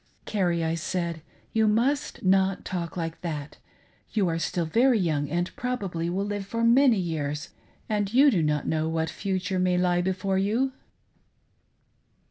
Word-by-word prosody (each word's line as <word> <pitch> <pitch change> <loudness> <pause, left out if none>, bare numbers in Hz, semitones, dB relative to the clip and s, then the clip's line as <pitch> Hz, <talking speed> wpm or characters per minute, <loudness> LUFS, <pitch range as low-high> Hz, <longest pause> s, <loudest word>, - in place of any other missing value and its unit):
"Carrie," 175 -5 0
I 160 0 0
said, 170 0 -2 0.3
"You 220 -1 +3
must 245 +7 0
not 190 0 +2
talk 175 -1 -4
like 165 -1 -4
that. 150 -4 -5 0.5
You 205 -4 +2
are 165 0 -1
still 170 +1 -1
very 235 +9 +3
young 155 -7 0
and 175 +3 -2
probably 195 -10 -2
will 190 +3 -1
live 205 -1 -4
for 230 +3 -2
many 240 0 +5
years, 150 -5 -3 0.4
and 205 -2 -1
you 275 +4 +6
do 185 -8 +2
not 150 -1 0
know 160 0 0
what 160 -1 -1
future 190 -1 -2
may 180 -1 +2
lie 180 -1 +2
before 190 +1 0
you." 230 +7 +1
185 Hz, 155 wpm, -26 LUFS, 165-210 Hz, 0.5 s, you